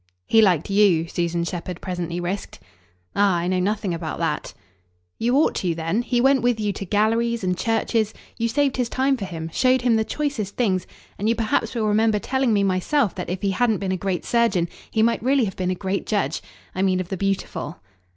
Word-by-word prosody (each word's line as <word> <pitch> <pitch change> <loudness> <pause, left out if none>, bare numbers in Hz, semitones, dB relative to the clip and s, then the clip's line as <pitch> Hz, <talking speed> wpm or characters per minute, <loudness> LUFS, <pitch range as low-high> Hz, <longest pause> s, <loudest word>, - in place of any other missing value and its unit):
"He 225 - +5
liked 185 -3 +2
YOU," 195 -5 +4
Susan 170 -1 -1
Shepherd 175 0 -5
presently 175 -2 -4
risked. 180 - -4 0.6
"Ah 200 -2 +3
I 170 0 -1
know 185 0 +1
nothing 200 0 0
about 165 -1 -4
that." - - -2 0.7
"You 240 +3 +1
ought 305 - +3
to 175 -3 -1
then. 165 +7 0
He 245 0 0
went 270 +1 +4
with 245 -2 +1
you 210 -1 0
to 195 - -6
galleries 225 +3 +1
and 180 -1 +1
churches; 225 +1 0 0.2
you 230 - 0
saved 275 +3 +1
his 245 -2 0
time 270 +2 +1
for 210 -6 -5
him, 165 -2 -6
showed 255 -1 +3
him 235 -3 +3
the 220 - +2
choicest 245 -7 -3
things, 190 -7 0 0.3
and 210 +3 +1
you 230 - +3
perhaps 225 +1 0
will 225 -2 0
remember 215 +1 +3
telling 265 +3 0
me 205 -2 +3
myself 195 - +1
that 180 - -5
if 180 +2 -4
he 200 - +2
hadn't 225 +2 +2
been 190 -1 -2
a - - +1
great 185 -1 -2
surgeon 230 -8 +2 0.2
he 220 - +1
might 230 +1 +2
really 260 +1 +3
have 190 - -5
been 185 -1 -2
a 185 - 0
great 190 +1 -3
judge. 195 -9 0 0.3
I 185 - -2
mean 190 -1 +2
of 185 -1 -4
the 195 - -2
beautiful." 195 -4 -2
205 Hz, 215 wpm, -23 LUFS, 180-230 Hz, 0.7 s, He